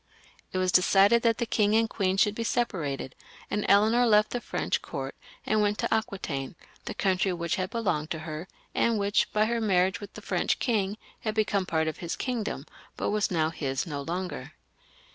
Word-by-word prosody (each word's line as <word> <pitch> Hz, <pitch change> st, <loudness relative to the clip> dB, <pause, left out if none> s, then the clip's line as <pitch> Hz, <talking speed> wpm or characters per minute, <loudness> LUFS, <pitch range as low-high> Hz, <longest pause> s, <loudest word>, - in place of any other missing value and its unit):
It -, -, -3 dB
was 185 Hz, 0 st, +2 dB
decided 195 Hz, +5 st, +5 dB
that 230 Hz, -1 st, +2 dB
the 235 Hz, -, -1 dB
king 210 Hz, -2 st, +2 dB
and 225 Hz, 0 st, +4 dB
queen 190 Hz, -3 st, 0 dB
should 205 Hz, +1 st, +4 dB
be 230 Hz, -, -3 dB
separated, 165 Hz, -, -1 dB, 0.4 s
and 210 Hz, -, 0 dB
Eleanor 220 Hz, +5 st, +5 dB
left 215 Hz, -1 st, +4 dB
the 245 Hz, -, -2 dB
French -, -, -1 dB
court -, -, -5 dB, 0.3 s
and 215 Hz, 0 st, +2 dB
went 210 Hz, 0 st, +1 dB
to -, -, 0 dB
Aquitaine, 185 Hz, -11 st, -2 dB, 0.3 s
the -, -, -5 dB
country 190 Hz, -1 st, +1 dB
which 170 Hz, -1 st, -2 dB
had 185 Hz, 0 st, -2 dB
belonged 190 Hz, -10 st, -1 dB
to 160 Hz, -, -3 dB
her, 155 Hz, +2 st, -5 dB, 0.3 s
and 230 Hz, -1 st, +2 dB
which, 205 Hz, +1 st, +1 dB
by 215 Hz, 0 st, +3 dB
her 230 Hz, +1 st, 0 dB
marriage 190 Hz, -1 st, +2 dB
with 205 Hz, -, -9 dB
the -, -, -8 dB
French -, -, 0 dB
king, 210 Hz, -5 st, 0 dB, 0.2 s
had 215 Hz, -1 st, -3 dB
become 205 Hz, -3 st, +1 dB
part 160 Hz, -1 st, +1 dB
of 160 Hz, -, -3 dB
his 170 Hz, -1 st, -3 dB
kingdom, 240 Hz, -4 st, -3 dB, 0.3 s
but -, -, -1 dB
was 210 Hz, 0 st, +1 dB
now 160 Hz, -3 st, +1 dB
his 135 Hz, -5 st, -2 dB
no 145 Hz, -4 st, -4 dB
longer. 165 Hz, -3 st, -4 dB
200 Hz, 195 wpm, -28 LUFS, 170-220 Hz, 0.4 s, decided